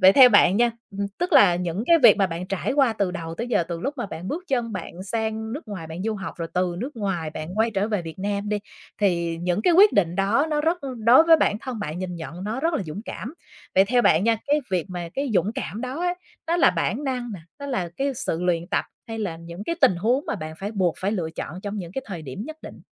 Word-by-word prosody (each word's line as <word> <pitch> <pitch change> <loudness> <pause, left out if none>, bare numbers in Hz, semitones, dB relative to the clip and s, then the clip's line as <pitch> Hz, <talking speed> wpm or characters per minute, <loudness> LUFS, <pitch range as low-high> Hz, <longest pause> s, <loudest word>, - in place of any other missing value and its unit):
vậy 190 +1 +8
theo 255 +1 +9
bạn 205 -3 +5
nha, 240 0 +4 0.2
ừm, 200 0 -3
tức 355 - -1
là 180 -4 +7
những 180 +3 -2
cái 335 -1 +6
việc - - +9
mà 195 - +3
bạn 175 +1 -5
trải 195 +7 -2
qua 270 -5 +3
từ 200 -4 -1
đầu 165 -3 -5
tới 235 +5 -4
giờ 210 -7 +2
từ 170 -1 -4
lúc 280 +7 -2
mà 240 - -2
bạn 175 0 -7
bước 350 +5 -4
chân 240 -4 0
bạn 185 -1 -6
sang 220 +2 -3
nước 275 -3 -7
ngoài 185 -6 -6
bạn 160 +3 -6
du 220 +1 -1
học, 195 -2 -6
rồi 165 -1 -4
từ 180 -1 +1
nước 255 +3 -5
ngoài 180 -7 -2
bạn 155 +1 -6
quay 225 +1 +3
trở 205 0 0
về 210 -5 -1
Việt 165 +1 -8
Nam 200 +1 -2
đi, 210 0 0 0.4
thì 170 -4 +1
những 180 +4 0
cái 350 - +4
quyết 400 +5 +7
định 175 -4 +2
đó 215 +10 +2
nó 300 -1 +1
rất 330 +3 +1 0.3
đối 255 +7 +8
với 330 -1 +7
bản 215 -8 +1
thân 255 -3 -6
bạn 155 -2 -4
nhìn 185 -1 -4
nhận 165 +4 -7
nó 225 +5 -3
rất 330 +1 +1
là 205 - 0
dũng 170 +5 -7
cảm. 250 +9 -6 0.4
Vậy 190 +1 +6
theo 245 +3 +2
bạn 165 0 +4
nha, 230 -1 +3
cái 295 +1 +3
việc 180 -1 0
mà 175 -2 -5
cái 275 -2 -1
dũng 190 +4 +2
cảm 235 -3 -5
đó 255 +5 -4
á, 355 0 0 0.3
nó 340 +1 +1
là 345 - +5
bản 210 - -1
năng 250 -3 -2
nè, 175 - -9 0.2
nó 280 - -6
là 190 -11 -2
cái 275 0 -1
sự 180 - -2
luyện 175 -1 0
tập - - 0 0.2
hay 225 -1 -5
là 185 -6 -3
những 170 +4 -9
cái 335 - -1
tình 180 - +5
huống 240 +10 +1
mà - - -1
bạn 155 0 -6
phải 200 +2 -4
buộc 185 -5 +1
phải 200 +3 -1
lựa 170 -6 -2
chọn 170 +2 -6
trong 205 +1 -4
những 175 -1 -6
cái 265 - -3
thời 175 -6 -6
điểm 140 +9 -6
nhất 315 0 -7
định? - - -10
205 Hz, 275 wpm, -24 LUFS, 175-245 Hz, 0.4 s, theo